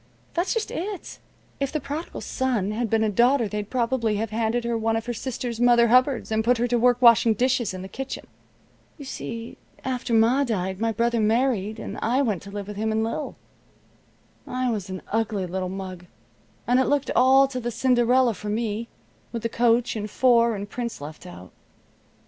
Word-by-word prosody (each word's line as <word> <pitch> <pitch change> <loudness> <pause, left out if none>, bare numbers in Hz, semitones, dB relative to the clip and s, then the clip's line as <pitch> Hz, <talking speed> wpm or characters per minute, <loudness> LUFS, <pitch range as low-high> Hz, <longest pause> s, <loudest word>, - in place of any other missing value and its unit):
That's 350 +7 0
just 445 -1 -2
it. 390 +2 -5 0.4
If 275 -1 -1
the 305 - -1
Prodigal 295 +4 -6
Son 240 -7 -1
had 225 +1 -2
been 220 +1 +2
a 220 - +2
daughter 240 +3 +3
they'd 210 0 -4
probably 235 -3 0
have 215 +1 -2
handed 230 +2 0
her 235 0 -1
one 225 0 0
of 225 0 -2
her 240 - -3
sister's 240 0 -4
mother 240 -1 +5
hubbards, 255 0 +3
and 220 0 +1
put 245 +2 +3
her 240 - +1
to 240 0 +2
work 245 +1 +3
washing 230 -1 +6
dishes 245 0 +1
in 185 0 -7
the - - -6
kitchen. 270 +7 -6 0.7
You 285 - -9
see, 230 -3 -6 0.3
after 255 -1 -3
Ma 235 +5 +4
died 190 -6 -2
my 225 0 +1
brother 235 +1 0
married, 220 -1 +1
and - - -6
I 250 +5 +2
went 210 -9 -1
to 200 - -11
live 200 0 -6
with 205 -1 -7
him 220 +1 -1
and 220 0 +1
Lil. 230 +7 -3 1.1
I 255 -1 -1
was 205 -4 -4
an 185 -1 -6
ugly 215 -3 0
little 185 +1 -3
mug, 185 -2 -7 0.6
and 245 +1 +3
it 260 - +3
looked 285 -1 +1
all 265 +2 +6
to 255 -2 -4
the 240 -1 -3
Cinderella 245 0 +3
for 210 +2 -7
me, 220 +1 -2 0.4
with 230 -2 -5
the 230 - 0
coach, 235 +1 +2
and 210 -1 -4
four, 235 -1 +3
and 200 0 -5
prince 235 +2 -5
left 150 +2 -9
out. 90 +1 -11
230 Hz, 195 wpm, -24 LUFS, 215-250 Hz, 1.1 s, washing